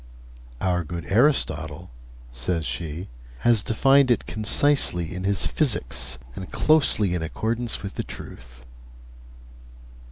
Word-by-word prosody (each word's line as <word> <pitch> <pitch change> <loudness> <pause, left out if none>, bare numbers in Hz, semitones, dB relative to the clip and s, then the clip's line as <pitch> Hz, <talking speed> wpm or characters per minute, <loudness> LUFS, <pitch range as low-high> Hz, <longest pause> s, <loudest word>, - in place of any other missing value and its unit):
'Our 90 -2 0
good 85 +1 -6
Aristotle,' 90 - +1 0.4
says 80 +8 -2
she, 85 +3 -4 0.3
'has 120 -3 +4
defined 135 +5 +3
it 120 - +2
concisely 110 - +2
in 90 +1 -5
his 100 0 0
"Physics," 85 - +1 0.2
and 95 - -8
closely 140 - +2
in 90 - -2
accordance 110 +7 -3
with 95 - -6
the - - -4
truth.' 60 -1 -11
95 Hz, 115 wpm, -24 LUFS, 80-120 Hz, 0.4 s, has